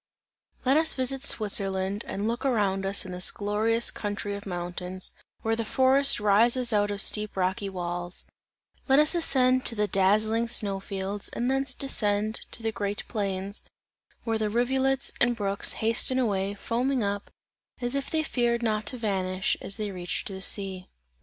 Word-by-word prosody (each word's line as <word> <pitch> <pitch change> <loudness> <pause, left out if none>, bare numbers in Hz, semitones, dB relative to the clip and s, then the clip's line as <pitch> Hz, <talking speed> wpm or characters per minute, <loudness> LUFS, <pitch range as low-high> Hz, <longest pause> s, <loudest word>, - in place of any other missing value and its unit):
Let 265 +3 +4
us 320 0 +4
visit 260 0 +1
Switzerland 200 -5 +2
and 200 +2 -3
look 235 +1 -2
around 200 -7 0
us 195 0 +2
in 185 - -7
the 180 0 -4
glorious 220 +3 0
country 205 -1 -4
of 200 0 -7
mountains, 180 +1 -4 0.3
where 225 0 +1
the 230 - -2
forest 265 +4 +4
rises 230 +4 +3
out 205 0 +2
of 205 -1 -3
steep 210 -2 0
rocky 190 +2 -1
walls; 175 -1 -4 0.6
let 270 0 +5
us 300 +3 +6
ascend 255 -6 +3
to 230 - +2
the 210 -1 +1
dazzling 215 +4 +2
snow 200 -4 0
fields, 195 +1 -5
and 245 +2 -1
thence 270 -1 0
descend 215 -5 -1
to 230 - -4
the 225 - 0
green 205 -1 -3
plains, 200 -2 -2 0.6
where 225 -2 -1
the 215 -1 0
rivulets 265 +4 +1
and 240 0 +3
brooks 200 -2 -2
hasten 230 +3 +2
away, 200 -5 0
foaming 245 +4 -1
up, 200 0 -3 0.5
as 245 0 -2
if 275 0 -2
they 315 -1 0
feared 240 -4 0
not 215 -2 -1
to 250 - -3
vanish, 190 -4 -1
as 195 - -3
they 210 -2 -3
reached 180 -2 -4
the 190 -1 -7
sea. 190 -1 -1
210 Hz, 165 wpm, -27 LUFS, 195-245 Hz, 0.6 s, us